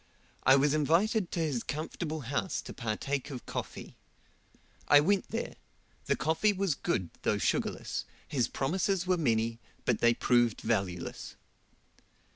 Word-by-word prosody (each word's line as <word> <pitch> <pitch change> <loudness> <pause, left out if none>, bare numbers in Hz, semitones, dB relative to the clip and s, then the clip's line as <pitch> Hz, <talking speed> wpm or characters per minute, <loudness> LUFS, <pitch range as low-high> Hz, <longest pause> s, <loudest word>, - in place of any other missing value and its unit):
I 130 - +6
was 140 +1 +3
invited 170 +7 +2
to 170 - -2
his 145 -7 0
comfortable 155 +2 -4
house 140 +8 -2
to - - -8
partake 130 +5 -2
of 130 -4 -7
coffee. - - -6 0.9
I 145 - +8
went 190 +6 +2
there: - - -4 0.5
the - - +3
coffee 165 +7 +2
was 195 -4 +1
good 95 -9 -2
though - - +1
sugarless, - - -1 0.2
his 125 -5 +1
promises 180 +6 0
were 185 0 +3
many, 115 -7 +1 0.3
but 120 - +2
they 120 0 +4
proved 120 -3 +2
valueless. 95 -6 -2
145 Hz, 135 wpm, -30 LUFS, 120-170 Hz, 0.9 s, I